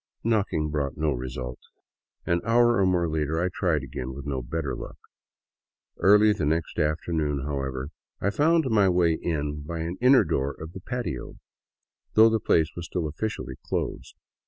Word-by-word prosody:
..." - - -53
Knocking 100 -9 0
brought 70 -3 -2
no 75 0 +1
result. 65 -1 -5 0.7
An 85 0 +1
hour 120 +1 +4
or 95 - +4
more 90 -2 +2
later 80 0 -1
I 90 +2 +1
tried 80 -6 0
again, 65 -1 -6
with 70 0 -8
no 70 -3 -2
better 70 +3 -3
luck. - - -8 1.0
Early 105 +3 +6
the 95 - -4
next 80 +3 -1
afternoon, 75 -2 0
however, 70 -2 -3 0.3
I 100 - 0
found 160 +7 +3
my 100 -3 +4
way 85 -2 +3
in 75 -2 -2
by 80 +3 -5
an 85 +3 -4
inner 130 +2 +6
door 70 +1 -1
of 80 +2 -8
the 95 - -8
patio, 120 - -4 0.8
though 110 +1 +8
the 110 - +2
place 80 -6 +2
was 85 0 -6
still 90 -3 -2
officially 75 - -4
closed. - - -4
80 Hz, 170 wpm, -26 LUFS, 70-100 Hz, 1.0 s, though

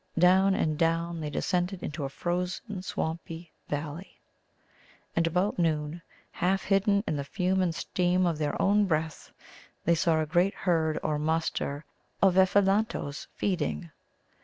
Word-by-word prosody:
Down 190 +3 +5
and 155 -1 0
down 165 0 +1
they 150 - -3
descended 180 +3 -1
into 150 -1 -4
a - - -3
frozen 180 +5 -3
swampy 165 -1 -5 0.2
valley. 150 +5 -5 1.0
And 165 0 +2
about 180 +4 0
noon, 160 0 0 0.3
half 190 +2 0
hidden 200 +1 +2
in 150 - -1
the 140 - -2
fume 185 +4 0
and 175 -3 0
steam 180 +2 +1
of 165 -3 0
their 150 -1 -1
own 205 +1 +4
breath, 160 -2 -2 0.5
they 170 - +4
saw 165 -1 +2
a 155 - +1
great 175 +5 +2
herd 160 -4 +1
or 150 -1 0
muster 155 -2 -1 0.3
of 190 -2 +4
Ephelantoes 195 -5 +2
feeding. 170 -2 -2
170 Hz, 140 wpm, -28 LUFS, 155-185 Hz, 1.0 s, Down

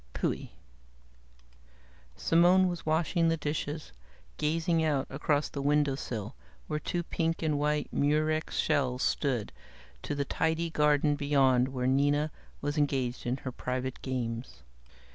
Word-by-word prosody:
Phui!" - - -2 1.7
Simone 175 - +4
was 175 -3 -4
washing 165 +2 +2
the 165 - +1
dishes, 150 - -3 0.5
gazing 165 +2 +1
out 145 -4 +1
across 145 +1 +1
the 140 - -5
windowsill 140 -6 0 0.3
where 150 - -2
two 175 +3 -2
pink 165 0 -1
and 150 -2 +1
white 150 0 0
Murex 155 +2 +1
shells 135 -4 +1
stood, 125 -7 0 0.5
to 145 - -3
the 140 0 -1
tidy 160 +3 0
garden 150 -1 +3
beyond 135 -3 +3
where 130 -2 -3
Nina 145 +3 +2 0.3
was 145 +1 -1
engaged 130 -4 0
in 125 +2 0
her 130 - -2
private 125 +1 -4
games. 115 - -4
145 Hz, 125 wpm, -30 LUFS, 130-155 Hz, 1.7 s, Simone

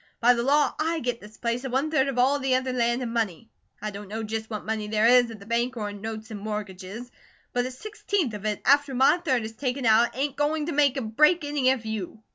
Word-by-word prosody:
By 245 +1 +6
the 235 - -1
law, 285 +2 +3
I 325 +1 0
get 245 -3 -3
this 210 +1 -13
place 235 +1 -2
and 265 - -4
one 275 +5 0
third 275 -3 +2
of 270 -2 -3
all 270 +3 +3
the 265 -1 +1
other 260 0 -1
land 240 0 +1
and 230 -1 -4
money. 225 -2 -2 0.3
I 215 - -2
don't 200 0 -8
know 220 +3 -4
just 220 0 -4
what 215 -2 -5
money 220 -1 -2
there 215 +1 +1
is 245 0 +6
at 225 - -8
the 200 - -13
bank 235 +3 -1
or 210 -2 -3
in 205 -1 -10
notes 220 0 -6
and 210 - -6
mortgages, 210 +2 -6 0.4
but 245 0 0
a - - -6
sixteenth 400 - -2
of 205 -1 -7
it 210 -1 -2
after 280 0 +4
my 265 +6 +5
third 265 -9 0
is 220 - -5
taken 255 +2 -3
out 230 +2 +4
ain't 280 0 -1
going 295 +1 0
to 335 - -3
make 285 -2 +3
or - - -1
break 300 +9 +3
any 290 -3 +1
of 260 -4 0
you. 220 0 -5
245 Hz, 260 wpm, -26 LUFS, 220-270 Hz, 0.4 s, By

